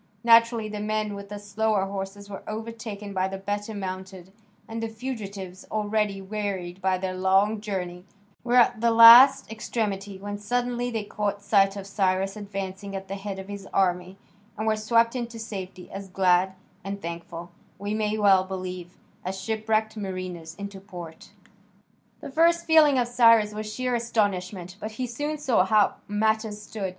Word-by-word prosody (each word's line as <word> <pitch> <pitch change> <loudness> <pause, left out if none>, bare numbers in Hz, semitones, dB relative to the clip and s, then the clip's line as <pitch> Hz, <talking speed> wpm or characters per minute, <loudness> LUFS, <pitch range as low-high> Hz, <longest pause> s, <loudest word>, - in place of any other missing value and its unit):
Naturally 230 -1 +5
the 210 0 -5
men 215 0 -1
with 200 0 -8
the 205 - -6
slower 205 0 0
horses 195 +1 -6
were 200 -1 -8
overtaken 220 -2 -6
by 190 0 +1
the 195 0 -5
better 205 +2 -4
mounted, 190 -1 -7 0.3
and 225 0 -5
the 225 - -1
fugitives, 205 -6 -6
already 210 -1 0
wearied 190 -3 -4
by 190 0 +1
their 185 0 -3
long 195 +3 +2
journey, 180 -4 -4 0.4
were 245 0 0
at 240 -2 +4
the 235 - +4
last 230 +3 +9
extremity 205 -3 -3
when 205 +1 -6
suddenly 245 +3 -1
they 225 -3 -3
caught 205 -1 -3
sight 195 -1 +3
of 200 -1 -6
Cyrus 195 0 0
advancing 195 -1 -6
at 195 0 -6
the - - -3
head 195 0 -5
of 190 0 -8
his 200 -1 -7
army, 180 0 0 0.4
and 215 - -3
were 220 0 +2
swept 230 +2 +2
into 235 -2 -4
safety, 190 -5 -7
as 195 0 -7
glad 185 0 +2 0.3
and 200 +1 -5
thankful, 170 0 -7 0.3
we 205 +2 -3
may 215 0 0
well 195 -3 +5
believe, 185 -2 -6 0.3
as 190 +1 -4
shipwrecked 220 +1 -1
mariners 185 -5 -6
into 200 0 -7
port. 175 -5 -10 0.9
The - - -8
first 335 +3 +3
feeling 310 -4 +6
of 245 -1 +2
Cyrus 230 -3 +5
was 215 0 -5
sheer 250 +2 -2
astonishment, 195 -6 -1
but 215 +1 -6
he 255 +3 -3
soon 290 +6 -3
saw 260 -10 +2
how 210 +2 +3
matters 215 0 0
stood. 210 -2 -5
205 Hz, 165 wpm, -26 LUFS, 190-220 Hz, 0.9 s, last